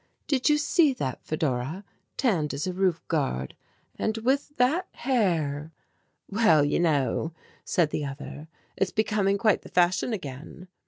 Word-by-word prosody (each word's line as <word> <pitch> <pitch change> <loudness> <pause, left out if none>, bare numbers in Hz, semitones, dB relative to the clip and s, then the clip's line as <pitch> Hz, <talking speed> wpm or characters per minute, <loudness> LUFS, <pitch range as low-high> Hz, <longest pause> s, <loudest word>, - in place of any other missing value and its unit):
"Did 275 0 +1
you 300 - +5
see 300 0 +3
that, 130 - -4
Fedora, 155 +3 -2 0.3
tanned 175 - +1
as 140 - -2
a 185 - -2
roof 185 -2 +1
guard 135 - -1 0.4
and 220 0 0
with 275 +5 0
that 295 +9 +2
hair!" 165 - 0 0.6
"Well, 195 -9 +4
you 145 - +1
know," 155 -1 +1 0.3
said 165 -4 +1
the 150 - -2
other, 145 +2 -7 0.3
"it's 195 - +1
becoming 210 -2 +1
quite 215 0 +2
the - - -12
fashion 180 +6 +2
again." 165 - -7
180 Hz, 145 wpm, -27 LUFS, 150-225 Hz, 0.6 s, you